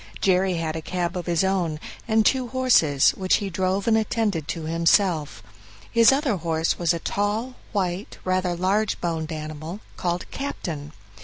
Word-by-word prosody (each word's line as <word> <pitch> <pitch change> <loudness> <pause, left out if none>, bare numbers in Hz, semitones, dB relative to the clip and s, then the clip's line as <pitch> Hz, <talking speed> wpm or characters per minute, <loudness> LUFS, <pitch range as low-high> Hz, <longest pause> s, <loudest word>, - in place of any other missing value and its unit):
Jerry 185 -1 +2
had 165 -1 -2
a 160 - -3
cab 175 +1 -2
of 180 -1 -4
his 170 0 +2
own, 180 -5 0 0.3
and 220 -1 +3
two 260 +1 +2
horses, 230 - +4
which 185 -1 +1
he 200 -2 -2
drove 190 +3 -1
and 225 - +4
attended 215 -7 0
to 165 - -4
himself. 165 0 +1 0.5
His 230 0 +6
other 270 -6 +1
horse 165 -1 -1
was 170 -2 +2
a 170 - 0
tall, 210 +8 -2 0.2
white, 190 -2 -2
rather 185 -1 0
large 195 +5 0
boned 165 -2 -2
animal 155 +4 -6 0.2
called 175 0 -2
"Captain". 155 - -5
180 Hz, 160 wpm, -24 LUFS, 165-205 Hz, 0.5 s, His